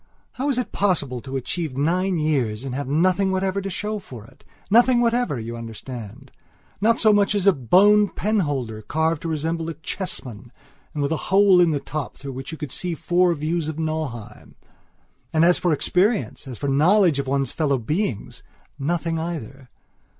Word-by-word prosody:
How 275 +3 -2
is 270 - 0
it 250 - -2
possible 145 -11 0
to 135 +2 -7
have - - +1
achieved 135 +2 -4
nine 180 +5 +1
years 135 -8 0
and 135 -2 -5
to - - -3
have 140 -2 -4
nothing 185 +6 +2
whatever 190 +1 0
to 195 - -4
show 210 +3 -3
for 120 - -11
it? - - -20 0.3
Nothing 240 +2 +5
whatever, 235 - +1
you 115 +1 -6
understand. 115 +2 -9 0.5
Not 230 +2 +3
so 215 -1 +5
much 205 0 +2
as 200 -2 0
a 200 - +6
bone 200 - +4
penholder, 145 - -1
carved 160 +5 -1
to - - -4
resemble 165 +1 -2
a 165 - -5
chessman 130 - -6 0.4
and 145 - -1
with 140 - -1
a 160 - +1
hole 195 -1 +6
in 175 - +4
the 150 -3 0
top 145 0 -5
through 140 0 -7
which 135 +4 -7
you 160 - -7
could 150 -4 -6
see 175 +3 -2
four 175 +1 +2
views 155 +2 -2
of 155 -1 -4
Nauheim. 155 -8 -5 0.8
And, 160 +1 +3
as 175 0 +4
for 175 - +1
experience, 185 - 0
as 125 -3 -7
for 140 - -3
knowledge 160 +3 +4
of 135 - -3
one's 135 -1 0
fellow 145 -4 0
beingsnothing 160 - -3
either. 140 -6 -6
160 Hz, 185 wpm, -23 LUFS, 135-190 Hz, 0.8 s, a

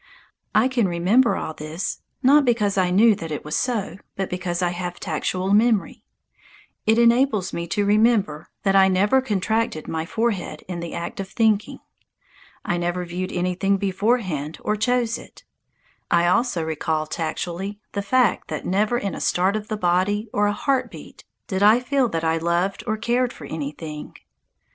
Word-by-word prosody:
I 220 +4 +5
can 245 -6 +1
remember 190 +9 +3
all 160 - -4
this, 155 +4 -5 0.2
not 285 +3 +6
because 230 -6 +1
I 185 -2 +2
knew 215 +5 +5
that 165 -4 -6
it 150 - -5
was 150 - -3
so, 230 -7 -1 0.2
but 195 -1 -3
because 180 0 -2
I 175 - +2
have 175 0 -5
tactual 185 +4 -1
memory. 220 -1 +2 0.8
It 220 +1 +4
enables 235 -3 +3
me 170 0 -3
to 205 +4 0
remember 205 -7 +2
that 195 -1 +2
I 190 -1 +7
never 200 +7 +3
contracted 215 -5 -1
my 160 0 -3
forehead 205 -8 -2
in 180 -2 -5
the 170 -1 -6
act 170 - -5
of 195 -1 -4
thinking. 215 -2 +1 0.8
I 175 - 0
never 175 +1 -2
viewed 180 +2 -4
anything 185 +2 0
beforehand 190 - -1
or 210 - 0
chose 235 +1 0
it. - - -15 0.7
I 170 0 +3
also 185 -1 +1
recall 160 0 -1
tactually 175 +5 -4
the 200 - -2
fact 235 +1 +2
that - - -5
never 210 +6 +1
in 200 -4 -3
a - - -6
start 185 +3 +1
of 215 -1 -4
the 215 - -3
body 205 +4 +1
or 205 0 +2
a - - +2
heart 265 +5 0
beat - - -13 0.2
did 190 0 -3
I 215 +4 +6
feel 255 0 +1
that 165 -4 -2
I 160 0 +1
loved 170 +4 0
or 220 -1 0
cared 240 +2 0
for - - -11
anything. 150 0 -6
195 Hz, 170 wpm, -23 LUFS, 175-225 Hz, 0.8 s, I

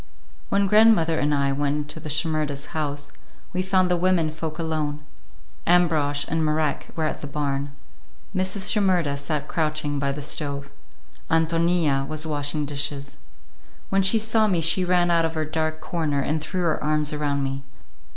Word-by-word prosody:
When 200 0 +2
grandmother 195 -6 +5
and 145 +1 +1
I 140 -1 +2
went 145 +1 0
into 150 +2 -4
the 155 - -7
Shimerdas' 150 -2 -1
house, 145 -2 -3 0.4
we 185 - 0
found 185 -1 +2
the - - +4
women 175 -3 +2
folk 155 0 -5
alone; 155 -3 -2 0.7
Ambrosch 155 -5 +3
and 160 0 0
Marek 155 -1 0
were 160 - -1
at 155 - -2
the 145 - -5
barn. 140 -1 -3 0.6
Mrs. 185 +1 0
Shimerda 185 -8 +2
sat 145 +1 -3
crouching 155 -2 -1
by 140 0 0
the 145 +1 -5
stove, 140 -1 -2 0.6
Ántonia 165 -3 +2
was 155 +1 -3
washing 150 0 -2
dishes. 140 0 -3 0.7
When 195 0 +3
she 195 +4 +5
saw 220 0 +2
me 185 -5 +1
she 165 +3 +3
ran 175 -1 +2
out 165 -1 +3
of 165 0 -1
her 155 0 -1
dark 155 0 -2
corner 155 -5 -1
and 155 +3 -1
threw 180 +4 -3
her 160 -3 0
arms 150 0 +1
around 145 -2 -1
me. 135 0 -3
155 Hz, 165 wpm, -24 LUFS, 145-170 Hz, 0.7 s, grandmother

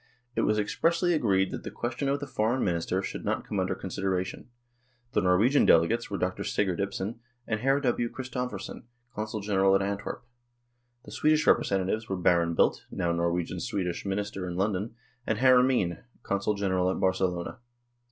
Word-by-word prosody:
It - - +1
was 105 - +2
expressly 170 - +1
agreed 95 - +2
that - - -5
the - - -6
question 120 +4 -3
of 140 +1 +1
the 145 - -4
Foreign 120 -1 0
Minister 90 +1 0
should - - -5
not - - -1
come 100 - -2
under 95 0 0
consideration. 95 +1 -3 0.6
The - - +2
Norwegian 100 +10 +4
delegates 100 +9 +3
were 100 - -2
Dr. 90 0 -2
Sigurd 95 -4 0
Ibsen 100 +3 -3 0.3
and 110 -1 -1
Hr. 135 +4 +3
W. 120 -3 0
Christophersen, 125 -2 -5 0.3
Consul 110 0 -4
General 95 -1 +3
at 95 - +2
Antwerp; 100 +4 -4 0.8
the - - -11
Swedish 155 0 +2
representatives 100 +3 +2
were 95 - -1
Baron 85 -2 +2
Bildt, - - +2
now 85 - -1
Norwegian 85 0 -1
Swedish 90 -3 -2
Minister 100 -1 -3
in 90 - -4
London, 100 +3 -1 0.3
and 110 - +1
Hr. 130 +1 +6
Ameen, 125 -10 +1 0.2
Consul 100 +2 0
General 95 -2 +1
at - - -2
Barcelona. 95 +2 0
100 Hz, 165 wpm, -28 LUFS, 95-120 Hz, 0.8 s, Hr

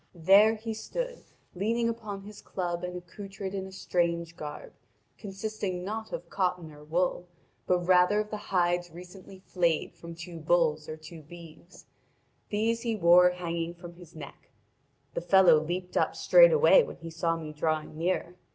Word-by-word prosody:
There 195 +6 +5
he 225 +1 -5
stood, - - -5 0.3
leaning 230 +5 0
upon 215 -4 -5
his 210 +1 -11
club 175 -2 -4
and 180 0 -4
accoutred 195 +2 -8
in 190 -1 -4
a - - -11
strange 170 -2 -1
garb, 150 -2 -8 0.5
consisting 195 -2 -4
not 220 +3 -5
of 170 +1 -6
cotton 180 -3 -2
or 150 0 -14
wool, 175 +3 -1 0.4
but 180 -1 +2
rather 180 +3 +4
of 210 0 -3
the 210 - -3
hides 175 -1 +1
recently 180 +3 -12
flayed 170 -3 0
from 170 0 -10
two 170 0 -9
bulls 155 -2 +1
or 155 - -6
two 155 +1 -12
beeves: 170 +2 -14 0.6
these 225 +2 0
he 230 -2 -1
wore 180 -1 +6
hanging 170 -1 -4
from 175 0 -11
his 170 -2 -16
neck. 145 -3 -11 0.6
The - - -3
fellow 180 -2 +6
leaped 180 +3 -5
up - - +1
straightway - - +6
when - - -6
he 165 -1 -9
saw 165 0 -1
me 155 -2 -7
drawing 155 0 -2
near. 175 +1 -2
180 Hz, 160 wpm, -28 LUFS, 170-200 Hz, 0.6 s, wore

